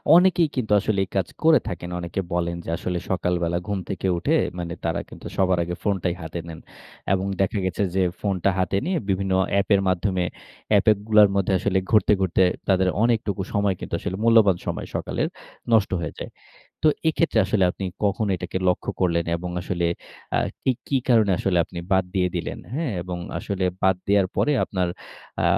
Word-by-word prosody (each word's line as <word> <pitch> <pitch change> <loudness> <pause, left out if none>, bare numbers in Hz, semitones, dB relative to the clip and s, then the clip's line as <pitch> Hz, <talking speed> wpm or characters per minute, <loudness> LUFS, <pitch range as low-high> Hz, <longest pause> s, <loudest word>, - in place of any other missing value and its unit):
অনেকেই 175 -1 +5
কিন্তু 115 -5 -2
আসলে 100 0 0
এই - - -27
কাজ 95 -3 +1 0.2
করে 160 -1 +6
থাকেন। 85 -3 -5
অনেকে 85 +2 -4
বলেন 85 0 0
যে - - -6
আসলে 90 +1 -3
সকালবেলা 85 -2 0
ঘুম 100 -2 -1
থেকে 95 0 -2
উঠে - - +1 0.2
মানে 85 -1 -4
তারা 80 - 0
কিন্তু - - -12
সবার 95 -1 +3
আগে 90 +1 -4
ফোনটাই 95 -4 0
হাতে 80 +1 -5
নেন। 80 -1 -8 0.5
এবং 95 0 0 0.2
দেখা 95 +2 +1
গেছে 95 +2 -1
যে 95 - +3 0.2
ফোনটা 100 -2 0
হাতে 95 +1 +1
নিয়ে 185 0 0
বিভিন্ন 95 0 0 0.2
অ্যাপের 100 0 +3
মাধ্যমে 95 0 +1 0.5
অ্যাপগুলার 105 0 +5
মধ্যে 100 0 +1 0.4
ঘুরতে, 105 -2 +5
ঘুরতে 95 0 +3 0.2
তাদের 95 -1 +3 0.2
অনেকটুকু 110 -4 +1
সময় 100 -2 +1
কিন্তু - - -8
আসলে 95 - -4
মূল্যবান 110 -5 +5
সময় - - -3
সকালের, - - -1 0.5
নষ্ট 110 -3 +4
হয়ে 75 - -4
যায়। - - -6 0.5
তো 155 - +5 0.2
এক্ষেত্রে 160 -6 +1
আসলে 95 0 +2
আপনি 95 - -6 0.2
কখন 100 +2 +1
এটাকে 95 - -4
লক্ষ্য 90 - 0
করলেন? 85 -2 +2
এবং 90 +1 -5
আসলে 85 -1 -1 0.5
আ - - +3 0.2
কি, 130 - +3 0.2
কি 140 - +2
কারণে 110 -5 +4
আসলে 95 -3 +1
আপনি 85 - -9
বাদ 95 -1 +4
দিয়ে 90 -2 +2
দিলেন, 85 - -4
হ্যা? 160 +4 -1 0.2
এবং 90 -1 -5 0.2
আসলে 100 -2 -3 0.2
বাদ 95 -1 +4
দেয়ার 100 -1 +4
পরে 150 - +2
আপনার 90 -2 -1 0.5
আ - - +1
95 Hz, 175 wpm, -24 LUFS, 90-105 Hz, 0.5 s, করে